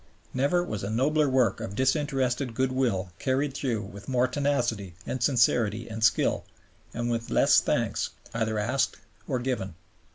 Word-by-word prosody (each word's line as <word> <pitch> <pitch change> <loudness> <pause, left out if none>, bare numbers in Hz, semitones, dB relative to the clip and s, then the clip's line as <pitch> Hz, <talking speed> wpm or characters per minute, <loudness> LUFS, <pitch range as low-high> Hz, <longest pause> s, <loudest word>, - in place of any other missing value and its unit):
Never 145 +7 +2
was 105 - -4
a 100 - -2
nobler 145 +6 +2
work 130 -3 +2
of 100 -3 -5
disinterested 130 -2 0
goodwill 125 -8 0
carried 135 +2 0
through 120 -6 -2
with 100 +2 -10
more 125 -1 +3
tenacity 120 - -1
and 130 - -3
sincerity 120 -3 +2
and 110 0 -5
skill, 110 - +3 0.5
and 120 +1 -2
with 115 0 -2
less - - +5
thanks - - 0 0.2
either 110 -1 -1
asked 130 +6 0 0.3
or 130 - 0
given. 120 -9 -3
125 Hz, 150 wpm, -27 LUFS, 110-135 Hz, 0.5 s, less